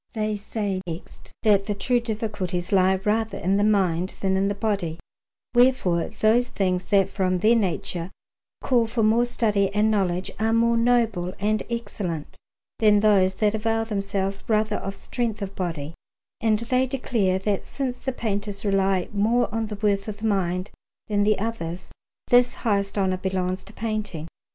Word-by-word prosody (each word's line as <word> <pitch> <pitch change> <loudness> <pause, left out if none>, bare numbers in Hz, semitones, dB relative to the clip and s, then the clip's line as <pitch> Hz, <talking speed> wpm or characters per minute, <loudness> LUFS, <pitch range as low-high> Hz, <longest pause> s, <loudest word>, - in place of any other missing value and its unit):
They 215 -2 -1
say, 205 -2 -3
next, 165 0 -9
that 200 -3 +3
the 205 - -1
true 245 +5 +1
difficulties 210 -6 -3
lie 190 -1 +4
rather 220 +1 0
in 190 +3 +1
the 205 - +2
mind 185 -4 +1
than 190 -1 +1
in 195 +1 +2
the 200 - -1
body, 200 -6 -1 0.6
wherefore 240 -9 +3
those 220 +3 +2
things 185 -2 -1
that 195 -3 +4
from 185 -2 0
their 215 +6 +4
nature 180 -4 -1 0.5
call 240 -3 +2
for 225 0 -1
more 225 +3 +4
study 210 -5 +1
and 215 +1 +3
knowledge 185 -3 0
are 220 +1 +1
more 230 +1 +3
noble 230 -6 +1
and 210 +1 +1
excellent 205 -9 -4 0.4
than 210 -2 +5
those 195 -3 +4
that 210 0 +1
avail 225 +1 0
themselves 195 -2 -2
rather 215 -1 +1
of 195 0 -5
strength 225 -1 -3
of 195 0 -6
body; 165 -4 -4 0.5
and 220 -1 +3
they 255 +3 +1
declare 230 -8 0
that 195 +1 -2
since 255 -3 -3
the 265 - -2
painters 205 -3 -3
rely 195 -2 +2
more 220 +3 +1
on 225 -1 -1
the 210 -1 -6
worth 200 -1 +1
of 210 -1 -5
the 220 +1 -2
mind 185 -2 -1 0.4
than 205 -1 +1
the 215 0 +3
others, 185 -5 -4 0.4
this 245 0 +5
highest 200 -2 +1
honour 190 -2 +1
belongs 185 0 -2
to - - -11
painting. 215 -9 -4
205 Hz, 165 wpm, -24 LUFS, 190-225 Hz, 0.6 s, than